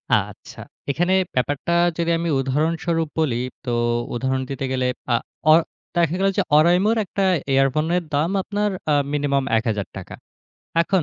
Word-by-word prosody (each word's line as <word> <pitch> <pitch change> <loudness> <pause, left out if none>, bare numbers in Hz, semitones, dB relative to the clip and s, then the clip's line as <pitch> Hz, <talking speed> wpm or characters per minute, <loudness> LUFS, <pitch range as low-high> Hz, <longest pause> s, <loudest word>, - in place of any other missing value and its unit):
আচ্ছা। - - -4 0.3
এখানে 175 +6 +1 0.2
ব্যাপারটা 145 +5 -1 0.3
যদি 170 -1 0
আমি 170 0 -2
উদাহরণস্বরূপ 160 +4 0
বলি, 150 -7 +1 0.3
তো 130 - -5 0.5
উদাহরণ 130 +2 -1
দিতে 135 0 -3
গেলে 130 -1 0 0.3
আ - - +5 0.4
অ - - +9 0.4
দেখা 170 -1 +2
গেল 195 - +2
যে, - - +4 0.2
oraimo 175 +6 +4 0.2
একটা 195 +1 -2 0.3
ইয়ারফোনের 155 +6 +2
দাম 150 +4 +1
আপনার 205 +2 -1 0.2
আ - - +4 0.2
মিনিমাম 140 -2 +1
৳১,০০০ 105 -4 -4 0.7
এখন 185 0 +1
155 Hz, 135 wpm, -22 LUFS, 135-170 Hz, 0.7 s, অ